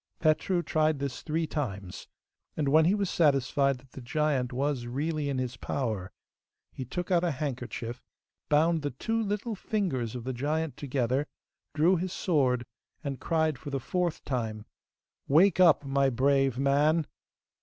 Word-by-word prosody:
Petru 170 Hz, +3 st, +2 dB
tried 155 Hz, -2 st, +1 dB
this 140 Hz, -2 st, -4 dB
three 160 Hz, +1 st, -1 dB
times, 100 Hz, -, -5 dB, 0.5 s
and 150 Hz, -3 st, 0 dB
when 155 Hz, +2 st, +5 dB
he 185 Hz, +5 st, +4 dB
was 200 Hz, -2 st, 0 dB
satisfied 140 Hz, -4 st, +2 dB
that 130 Hz, +1 st, -21 dB
the 135 Hz, -, -9 dB
giant 135 Hz, -1 st, 0 dB
was 130 Hz, -1 st, -1 dB
really 145 Hz, +3 st, -2 dB
in 135 Hz, -, -1 dB
his 125 Hz, -2 st, -3 dB
power 110 Hz, -8 st, -3 dB, 0.6 s
he 130 Hz, -, -6 dB
took 175 Hz, +9 st, -5 dB
out 175 Hz, -1 st, +3 dB
a 175 Hz, -, +2 dB
handkerchief, 125 Hz, -4 st, -4 dB, 0.5 s
bound 160 Hz, +2 st, +3 dB
the 145 Hz, -, -1 dB
two 225 Hz, -, -2 dB
little 210 Hz, +2 st, -2 dB
fingers 180 Hz, -, -2 dB
of 120 Hz, -, -5 dB
the 130 Hz, +1 st, -3 dB
giant 150 Hz, +3 st, -1 dB
together, 135 Hz, +1 st, -1 dB, 0.5 s
drew 170 Hz, +5 st, +4 dB
his 180 Hz, +2 st, -3 dB
sword, 130 Hz, -10 st, +1 dB, 0.4 s
and 140 Hz, -3 st, -4 dB
cried 160 Hz, -5 st, +1 dB
for 145 Hz, -, -7 dB
the 140 Hz, -1 st, -2 dB
fourth 175 Hz, +5 st, -2 dB
time, 110 Hz, -5 st, -3 dB, 0.6 s
'Wake 175 Hz, +6 st, +5 dB
up, 165 Hz, -5 st, +6 dB
my 135 Hz, 0 st, +2 dB
brave 135 Hz, 0 st, +2 dB
man. 145 Hz, +4 st, +3 dB
145 Hz, 155 wpm, -29 LUFS, 130-160 Hz, 0.6 s, up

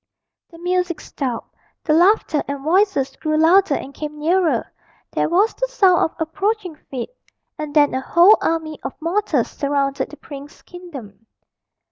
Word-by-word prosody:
The 330 Hz, -, -14 dB
music 360 Hz, 0 st, -1 dB
stopped, 255 Hz, -5 st, -5 dB, 0.3 s
the 305 Hz, -, +1 dB
laughter 345 Hz, -2 st, +3 dB
and 280 Hz, -1 st, -5 dB
voices 320 Hz, -5 st, +1 dB
grew 310 Hz, 0 st, -1 dB
louder 330 Hz, 0 st, +4 dB
and 275 Hz, -, -6 dB
came 300 Hz, 0 st, -6 dB
nearer, 335 Hz, +3 st, +1 dB, 0.5 s
there -, -, 0 dB
was 390 Hz, +7 st, +3 dB
the -, -, -2 dB
sound 385 Hz, -8 st, +3 dB
of 320 Hz, -, 0 dB
approaching 380 Hz, +2 st, -2 dB
feet 260 Hz, -, -5 dB, 0.4 s
and 305 Hz, -1 st, -6 dB
then 290 Hz, -1 st, +4 dB
a 260 Hz, -, -1 dB
whole 350 Hz, +9 st, +5 dB
army 320 Hz, -2 st, -2 dB
of -, -, -7 dB
mortals 360 Hz, +6 st, 0 dB
surrounded 280 Hz, -1 st, -1 dB
the 300 Hz, -, -12 dB
prince's 285 Hz, 0 st, -11 dB
kingdom. 260 Hz, -, -11 dB
320 Hz, 150 wpm, -20 LUFS, 285-365 Hz, 0.5 s, whole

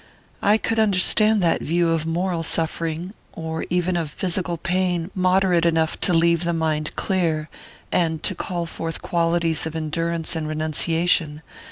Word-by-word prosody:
"I 205 Hz, +2 st, +4 dB
could 225 Hz, 0 st, -1 dB
understand 215 Hz, 0 st, +5 dB
that 170 Hz, -, +2 dB
view 170 Hz, +1 st, +1 dB
of 165 Hz, -1 st, 0 dB
moral 175 Hz, +1 st, -1 dB
suffering 165 Hz, +2 st, -2 dB, 0.2 s
or 160 Hz, 0 st, -5 dB
even 180 Hz, +1 st, 0 dB
of 165 Hz, -3 st, -2 dB
physical 175 Hz, +1 st, -2 dB
pain 180 Hz, 0 st, -1 dB
moderate 185 Hz, -2 st, +2 dB
enough 160 Hz, -1 st, +1 dB
to -, -, 0 dB
leave 170 Hz, 0 st, +3 dB
the 170 Hz, 0 st, 0 dB
mind 155 Hz, -2 st, -1 dB
clear, 165 Hz, -5 st, -1 dB, 0.4 s
and 160 Hz, -3 st, 0 dB
to 190 Hz, -, 0 dB
call 175 Hz, -1 st, -4 dB
forth 165 Hz, -1 st, -5 dB
qualities 165 Hz, -2 st, +1 dB
of 160 Hz, -, -7 dB
endurance 165 Hz, +1 st, -2 dB
and 160 Hz, -1 st, -3 dB
renunciation. 155 Hz, 0 st, 0 dB
170 Hz, 150 wpm, -22 LUFS, 160-180 Hz, 0.4 s, understand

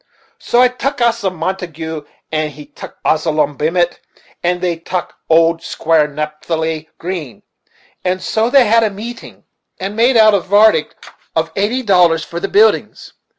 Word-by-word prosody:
So 240 Hz, -, +1 dB
I -, -, +6 dB
tuck 255 Hz, +3 st, -3 dB
Asa 230 Hz, -4 st, +1 dB
Montagu, 165 Hz, -3 st, -5 dB, 0.2 s
and 155 Hz, -1 st, -1 dB
he 150 Hz, +1 st, -11 dB
tuck -, -, -12 dB
Absalom 155 Hz, -2 st, +1 dB
Bement, 170 Hz, +5 st, 0 dB, 0.4 s
and 180 Hz, +1 st, 0 dB
they 175 Hz, -1 st, -1 dB
two -, -, -24 dB
tuck 180 Hz, +1 st, -5 dB
old 165 Hz, +1 st, +3 dB
Squire 160 Hz, -2 st, +1 dB
Napthali 155 Hz, +1 st, -3 dB
Green. 165 Hz, -, -6 dB, 0.6 s
And 185 Hz, 0 st, 0 dB
so 220 Hz, +4 st, 0 dB
they 265 Hz, -1 st, +5 dB
had 230 Hz, +2 st, +4 dB
a 220 Hz, -, +2 dB
meetin', 230 Hz, +5 st, -9 dB, 0.4 s
and 195 Hz, +2 st, -4 dB
made 235 Hz, +2 st, +3 dB
out 215 Hz, -1 st, +6 dB
a 200 Hz, -, +4 dB
vardict 200 Hz, -4 st, +2 dB, 0.3 s
of 165 Hz, 0 st, 0 dB
eighty 220 Hz, +6 st, 0 dB
dollars 175 Hz, -6 st, +3 dB
for 170 Hz, -1 st, -6 dB
the -, -, -2 dB
buildin's. 430 Hz, +3 st, +2 dB
175 Hz, 155 wpm, -16 LUFS, 160-215 Hz, 0.6 s, I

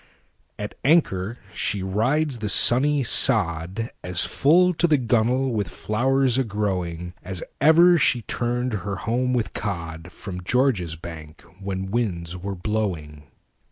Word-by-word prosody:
At 105 Hz, 0 st, -6 dB
anchor 120 Hz, -, +1 dB, 0.2 s
she 100 Hz, -2 st, -2 dB
rides 125 Hz, +8 st, 0 dB
the 105 Hz, -1 st, -3 dB
sunny 140 Hz, +7 st, +4 dB
sodAs 90 Hz, -1 st, +1 dB
full 180 Hz, +5 st, +3 dB
to 175 Hz, +1 st, +1 dB
the 155 Hz, -3 st, +3 dB
gunnel 125 Hz, +2 st, +1 dB
with 105 Hz, -4 st, -1 dB
flowers 130 Hz, +6 st, 0 dB
a -, -, +2 dB
growingAs 90 Hz, -4 st, -4 dB, 0.2 s
ever 170 Hz, +4 st, +6 dB
she 125 Hz, -4 st, +2 dB
turned 120 Hz, +2 st, -2 dB
her 100 Hz, 0 st, -3 dB
home 125 Hz, +6 st, -1 dB
with 120 Hz, -3 st, -2 dB
codFrom 90 Hz, 0 st, -6 dB
George's 105 Hz, -, 0 dB
Bank 80 Hz, -2 st, -11 dB, 0.2 s
when 95 Hz, -1 st, -5 dB
winds 90 Hz, -7 st, -2 dB
were 95 Hz, +2 st, -5 dB
blowing. 90 Hz, -8 st, -4 dB
105 Hz, 120 wpm, -23 LUFS, 90-125 Hz, 0.2 s, ever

